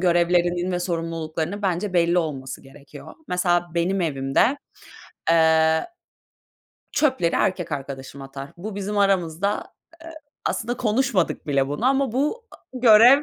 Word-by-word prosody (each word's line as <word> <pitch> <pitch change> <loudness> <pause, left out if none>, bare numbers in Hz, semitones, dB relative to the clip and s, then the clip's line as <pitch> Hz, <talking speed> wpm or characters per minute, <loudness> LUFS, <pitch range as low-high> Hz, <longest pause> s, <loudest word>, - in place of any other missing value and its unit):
görevlerinin 175 0 +2
ve 180 - -1
sorumluluklarının 165 +2 -3
bence 185 +1 -1
belli 175 0 +3
olması 135 -6 -4
gerekiyor. 135 +1 -13
Mesela 175 -1 +1
benim 185 +3 0
evimde, 150 - +1 0.7
eee, 160 - +4 1.1
çöpleri 260 - +1
erkek 180 -4 0
arkadaşım 135 -1 -6
atar. 135 +1 -8
Bu 200 +3 -7
bizim 205 +1 -3
aramızda, 190 -2 +1
aaa, 330 +7 -10 0.4
aslında 235 +2 -2
konuşmadık 215 -5 0
bile 140 -2 +1
bunu 145 - -3
ama 270 -2 +2
bu, 300 - -1
a - - -14 0.2
görev 245 +2 +7
175 Hz, 125 wpm, -23 LUFS, 160-210 Hz, 1.1 s, görev